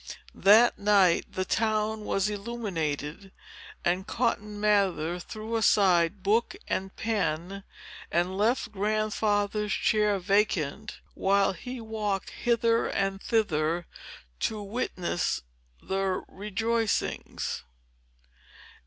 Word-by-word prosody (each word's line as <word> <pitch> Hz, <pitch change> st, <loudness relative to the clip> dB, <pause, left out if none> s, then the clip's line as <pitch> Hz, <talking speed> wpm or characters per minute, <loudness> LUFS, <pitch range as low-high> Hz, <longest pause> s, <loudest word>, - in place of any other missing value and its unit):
That 220 Hz, +5 st, +5 dB
night, 200 Hz, -4 st, +3 dB
the 185 Hz, -, -2 dB
town 215 Hz, 0 st, 0 dB
was 195 Hz, 0 st, +1 dB
illuminated; 195 Hz, -6 st, -4 dB, 0.5 s
and 180 Hz, +2 st, 0 dB
Cotton 210 Hz, -3 st, -1 dB
Mather 190 Hz, -5 st, +1 dB
threw 215 Hz, +5 st, -6 dB
aside 190 Hz, -4 st, +3 dB
book 230 Hz, -, +2 dB
and 190 Hz, 0 st, -3 dB
pen, 195 Hz, -3 st, -2 dB, 0.5 s
and 175 Hz, +2 st, +1 dB
left 220 Hz, +3 st, +1 dB
Grandfather's 210 Hz, 0 st, 0 dB
chair 210 Hz, 0 st, +2 dB
vacant, 200 Hz, -1 st, 0 dB
while 195 Hz, 0 st, +2 dB
he 250 Hz, +8 st, -7 dB
walked 215 Hz, -4 st, -3 dB
hither 230 Hz, -1 st, +1 dB
and 195 Hz, 0 st, -1 dB
thither 170 Hz, -6 st, 0 dB, 0.5 s
to 215 Hz, -2 st, -2 dB
witness 195 Hz, -, -2 dB, 0.4 s
the 190 Hz, -1 st, -1 dB
rejoicings. 210 Hz, -, -2 dB
205 Hz, 90 wpm, -28 LUFS, 185-215 Hz, 0.5 s, That